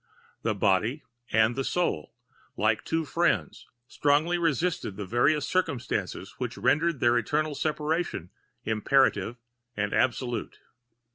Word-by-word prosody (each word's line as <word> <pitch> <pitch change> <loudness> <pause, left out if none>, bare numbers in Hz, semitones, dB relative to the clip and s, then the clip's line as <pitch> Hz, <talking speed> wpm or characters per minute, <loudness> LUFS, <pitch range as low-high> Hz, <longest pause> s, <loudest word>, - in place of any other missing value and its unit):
The 110 -2 0
body 105 +8 +1 0.3
and 110 +2 +3
the 135 - -1
soul, 150 - -1 0.4
like 110 +1 +1
two 160 0 -1
friends, 140 - 0 0.2
strongly 150 +6 +2
resisted 165 - 0
the 105 - -4
various 130 +9 +2
circumstances 125 - -2
which 125 -1 -4
rendered 160 -1 +2
their 120 0 +4
eternal 150 +6 -1
separation 150 - -2 0.3
imperative 110 -1 +2 0.4
and 105 0 -1
absolute. 125 -1 0
130 Hz, 115 wpm, -27 LUFS, 110-155 Hz, 0.4 s, their